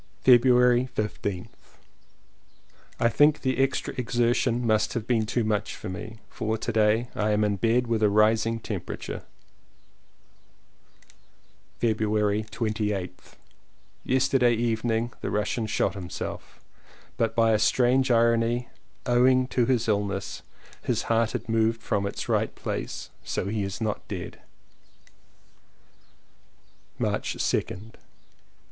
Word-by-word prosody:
February 125 0 +5
15th. 100 -3 -5 1.2
I 115 - +4
think 145 +5 +4
the 130 -1 -1
extra 135 0 0
exertion 120 0 +1
must 110 -1 +2
have 115 -3 -2
been 115 -3 +1
too 120 +2 0
much 105 -2 -1
for - - -7
me, 110 +4 -7
for 110 -1 -3
to 115 - -3
day 110 +2 +2
I 105 0 0
am 105 0 +2
in 105 -1 +1
bed 115 +4 +2
with 115 -2 -1
a 105 - +4
rising 110 +2 +3
temperature. - - -5 2.6
February 110 -2 +1
28th. 105 -3 -3 0.7
Yesterday 130 -2 +3
evening 115 0 -1
the - - -3
Russian 105 +2 -1
shot 110 - 0
him 95 -3 -7
self, - - -7 0.6
but 115 -1 0
by 115 -1 +4
a 110 - +3
strange 130 +4 +3
irony, 115 0 +2 0.4
owing 130 +1 +4
to 120 -3 +1
his 120 -3 +1
illness, 100 -2 -1 0.4
his - - -1
heart 115 -1 +1
had - - -4
moved 115 0 +1
from 100 0 0
its - - -5
right - - 0
place, - - -5
so - - -3
he 105 +2 -2
is 100 0 -4
not 110 -2 -3
dead. 90 -3 -7
115 Hz, 115 wpm, -26 LUFS, 105-120 Hz, 2.6 s, February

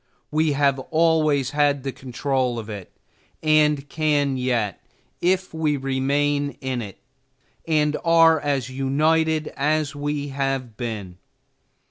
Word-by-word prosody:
We 155 0 +2
have 140 -1 +2
always 155 -4 +2
had 145 -2 +2
the 135 - -2
control 130 -1 -2
of 110 -1 -6
it, 100 -3 -8 0.5
and 150 -2 +3
can 145 -3 +1
yet, 120 -6 -1 0.4
if 185 +1 +1
we 155 -2 0
remain 140 +1 0
in 130 -2 -3
it, 100 -3 -8 0.7
and 150 -2 +2
are 165 -1 +5
as 140 -4 -1
united 155 +4 +1
as 150 +1 0
we 145 0 -3
have 135 -4 -2
been. 105 -6 -6
145 Hz, 120 wpm, -23 LUFS, 130-155 Hz, 0.7 s, are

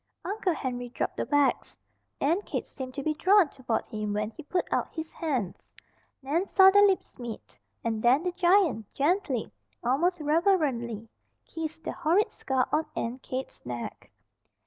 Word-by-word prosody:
Uncle 385 -3 0
Henry 245 -3 -4
dropped - - -3
the - - -2
bags. 290 -1 +1 0.4
Aunt 335 +8 +1
Kate - - -3
seemed 255 -2 -8
to 280 - -4
be 310 - +1
drawn 370 +1 +4
toward 250 -5 -2
him 215 -2 -3
when 210 +1 -1
he 275 - -10
put 355 +4 -1
out - - 0
his 320 -1 -5
hands. 260 - -3 0.5
Nan 325 +8 0
saw 385 -1 +7
their 405 +1 +7
lips 385 -8 -1
meet, 235 -3 -8 0.2
and 225 -2 -1
then 255 +7 +4
the 360 - 0
giant 355 - +2
gently, 290 - 0 0.3
almost 330 +9 +2
reverently, 295 - +1 0.4
kissed 325 0 -6
the - - -3
horrid 345 +6 +2
scar 260 -1 0
on 310 +1 +1
Aunt 240 +3 -3
Kate's 260 +1 -6
neck. 120 -1 -6
295 Hz, 160 wpm, -28 LUFS, 245-350 Hz, 0.5 s, saw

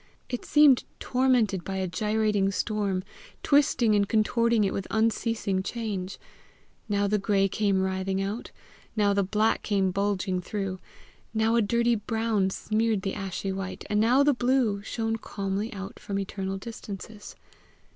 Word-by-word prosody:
It 245 - -4
seemed 295 -4 +6 0.2
tormented 245 -8 +2
by 195 - -4
a 190 0 -1
gyrating 210 +1 +1
storm, 200 -2 -1 0.4
twisting 270 -6 +3
and 200 -1 +2
contorting 230 +1 +2
it 195 - 0
with 195 - -3
unceasing 220 -3 0
change. 200 -3 -4 0.7
Now 205 0 +1
the 210 +1 +1
gray 195 0 +2
came 200 -1 +1
writhing 190 0 -1
out, 200 +4 -3 0.5
now 205 -2 +3
the 200 - +2
black 210 +3 +1
came 195 -3 +1
bulging 195 -1 -1
through, 195 -1 -4 0.6
now 220 +1 +2
a 235 - +4
dirty 235 +3 +2
brown 220 -2 0
smeared 215 0 0
the 195 - -2
ashy 195 -1 -4
white, 190 0 -5
and 210 - +2
now 245 +6 +4
the 290 0 +4
blue 245 -5 +1
shone 225 +1 -2
calmly 200 +1 -3
out 195 -1 -7
from 200 - -4
eternal 195 0 -3
distances. 210 0 -8
205 Hz, 145 wpm, -27 LUFS, 195-225 Hz, 0.7 s, seemed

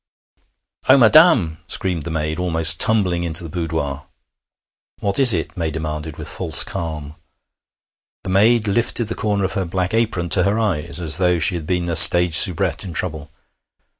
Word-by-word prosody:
'Oh, 130 - +6
madam!' 115 - +3
screamed 90 -4 -4
the - - -6
maid, 80 0 -5
almost 80 -2 +2
tumbling 95 -6 +1
into 85 0 -2
the 80 - -10
boudoir. 80 -5 -6 0.9
'What 100 +3 -2
is 130 -3 +8
it?' 80 -4 -4
May 85 -3 -4
demanded 80 -1 -7
with - - -9
false - - +1
calm. 75 -3 -8 1.1
The 95 - -6
maid 110 +3 +1
lifted 115 +1 -2
the - - -4
corner 105 -3 -3
of 95 - -3
her 95 - -3
black 90 +2 -4
apron 110 -7 -3
to 90 - +5
her 100 +4 -1
eyes, 90 -8 -3
as 80 0 +1
though 90 -1 0
she 85 +4 +1
had 80 -3 -7
been 90 -1 -3
a 85 - -4
stage 85 +1 +7
soubrette 90 -1 +2
in 90 -4 -9
trouble. 80 -3 -6
85 Hz, 170 wpm, -17 LUFS, 80-100 Hz, 1.1 s, is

